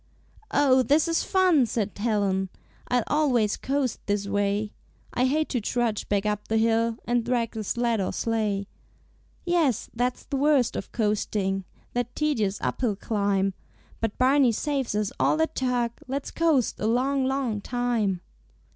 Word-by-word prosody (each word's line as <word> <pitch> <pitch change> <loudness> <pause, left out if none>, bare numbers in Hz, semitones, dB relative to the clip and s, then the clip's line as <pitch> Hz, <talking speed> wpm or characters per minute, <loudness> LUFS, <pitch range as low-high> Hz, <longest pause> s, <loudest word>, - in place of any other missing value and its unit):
"Oh, 265 -2 +4
this 295 +6 +3
is 330 0 +1
fun!" 365 -9 +3
said 215 -3 -1
Helen, 200 -3 0 0.4
"I'll 245 -2 +2
always 250 -9 +2
coast 270 -3 -1
this 205 0 0
way; 205 +1 0 0.4
I 250 - +2
hate 310 +4 +1
to 245 - -1
trudge 230 0 -1
back 200 0 +1
up 210 0 -2
the 220 - +1
hill, 225 0 +2
And 240 0 +1
drag 235 -1 0
the 220 -1 -5
sled 235 0 0
or 185 - -1
sleigh." 215 -3 -1 0.8
"Yes, 330 - +1
that's 245 +2 -1
the 275 - -3
worst 280 -3 +3
of - - -5
coasting, 205 -3 -1 0.3
That 245 0 -2
tedious 220 -10 0
uphill 230 -6 0
climb; 200 -2 0 0.5
But 225 -2 -2
Barney 260 -1 +4
saves 270 -3 -1
us 210 -1 0
all - - +3
that 320 0 0
tug, 250 -2 0 0.2
Let's 275 +2 -3
coast 315 -7 +1
a 215 - 0
long, 260 +3 +1
long 260 -6 -1
time." 230 -6 -1
235 Hz, 155 wpm, -26 LUFS, 210-265 Hz, 0.8 s, Oh